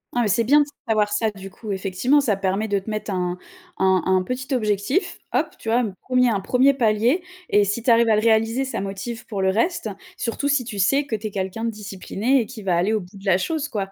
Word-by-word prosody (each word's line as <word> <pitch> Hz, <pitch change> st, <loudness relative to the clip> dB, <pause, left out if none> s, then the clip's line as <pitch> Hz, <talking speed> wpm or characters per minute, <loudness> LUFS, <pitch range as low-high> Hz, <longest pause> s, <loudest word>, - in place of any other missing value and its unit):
Ah, 245 Hz, -, +3 dB
mais -, -, +1 dB
c'est 220 Hz, +4 st, +2 dB
bien 290 Hz, +6 st, +5 dB
de -, -, +2 dB, 0.2 s
savoir 210 Hz, -2 st, +1 dB
ça, 220 Hz, +1 st, +1 dB
du 195 Hz, -2 st, -10 dB
coup, 215 Hz, +2 st, -7 dB
effectivement. 195 Hz, +8 st, +1 dB
Ça 235 Hz, -8 st, +1 dB
permet 195 Hz, +2 st, -1 dB
de 200 Hz, -1 st, +1 dB
te 195 Hz, -, -9 dB
mettre 215 Hz, -1 st, -3 dB
un 180 Hz, -1 st, -1 dB, 0.4 s
un 190 Hz, -1 st, +3 dB
un 185 Hz, 0 st, +2 dB
petit 260 Hz, +7 st, -4 dB
objectif. 215 Hz, -, 0 dB
Hop, -, -, +1 dB
tu 225 Hz, -, -5 dB
vois? 235 Hz, +2 st, +3 dB
Un 220 Hz, -4 st, -2 dB, 0.2 s
premier 250 Hz, -1 st, +3 dB
un 205 Hz, -, 0 dB
premier 255 Hz, +7 st, +3 dB
palier, 235 Hz, -, +2 dB, 0.3 s
et 205 Hz, -, +4 dB
si 205 Hz, +3 st, -2 dB
tu 245 Hz, -, +4 dB
arrives 230 Hz, 0 st, +5 dB
à 220 Hz, -, +5 dB
le 210 Hz, -, +2 dB
réaliser, 225 Hz, +3 st, +2 dB
ça 260 Hz, -, -3 dB
motive 200 Hz, +4 st, -6 dB
pour 200 Hz, -4 st, -3 dB
le 190 Hz, -, +3 dB
reste, 230 Hz, -, 0 dB, 0.3 s
surtout 250 Hz, +4 st, -2 dB
si 285 Hz, -3 st, +2 dB
tu 215 Hz, -4 st, -6 dB
sais 275 Hz, +10 st, +3 dB
que 240 Hz, -, -2 dB
tu 215 Hz, 0 st, -4 dB
es -, -, -7 dB
quelqu'un 190 Hz, +3 st, -3 dB
de 230 Hz, -, 0 dB
discipliné 215 Hz, +4 st, -1 dB
et -, -, -3 dB
qui 235 Hz, -4 st, -9 dB
va 185 Hz, -3 st, +1 dB
aller 180 Hz, +6 st, +1 dB
au 215 Hz, -, +1 dB
bout 185 Hz, +3 st, -13 dB
de 195 Hz, -, -13 dB
la 190 Hz, -2 st, +4 dB
chose, 305 Hz, -, -2 dB
quoi. 195 Hz, -5 st, -3 dB
215 Hz, 260 wpm, -22 LUFS, 195-245 Hz, 0.4 s, bien